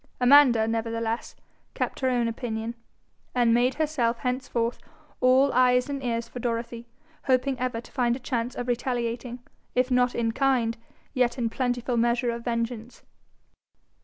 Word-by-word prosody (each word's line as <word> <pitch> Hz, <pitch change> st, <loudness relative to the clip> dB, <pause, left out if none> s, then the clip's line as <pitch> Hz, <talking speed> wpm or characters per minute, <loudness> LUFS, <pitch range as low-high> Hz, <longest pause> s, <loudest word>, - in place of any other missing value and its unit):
Amanda, 250 Hz, -3 st, +6 dB
nevertheless, 230 Hz, 0 st, -2 dB, 0.4 s
kept -, -, -2 dB
her 260 Hz, -, +1 dB
own 240 Hz, -2 st, +1 dB
opinion, 230 Hz, -1 st, -4 dB, 0.6 s
and 240 Hz, -2 st, +4 dB
made 245 Hz, +2 st, +2 dB
herself 285 Hz, -7 st, 0 dB
henceforth 250 Hz, -2 st, -2 dB, 0.4 s
all 260 Hz, +2 st, +4 dB
eyes 250 Hz, +1 st, +3 dB
and 275 Hz, -1 st, -4 dB
ears 230 Hz, -1 st, -2 dB
for 245 Hz, -, -8 dB
Dorothy, 235 Hz, 0 st, -3 dB, 0.4 s
hoping 260 Hz, 0 st, +2 dB
ever 250 Hz, -2 st, -2 dB
to 230 Hz, -, -13 dB
find 240 Hz, -3 st, +1 dB
a -, -, -7 dB
chance 245 Hz, -1 st, -3 dB
of 245 Hz, -, -4 dB
retaliating, 245 Hz, 0 st, -2 dB, 0.3 s
if 250 Hz, +1 st, +1 dB
not 250 Hz, 0 st, +2 dB
in 230 Hz, -1 st, 0 dB
kind 245 Hz, -3 st, +1 dB, 0.4 s
yet 250 Hz, -2 st, +1 dB
in 230 Hz, -3 st, -1 dB
plentiful 245 Hz, -1 st, -1 dB
measure 235 Hz, +1 st, +1 dB
of 235 Hz, 0 st, -6 dB
vengeance. 230 Hz, 0 st, -4 dB
245 Hz, 145 wpm, -26 LUFS, 230-255 Hz, 0.6 s, Amanda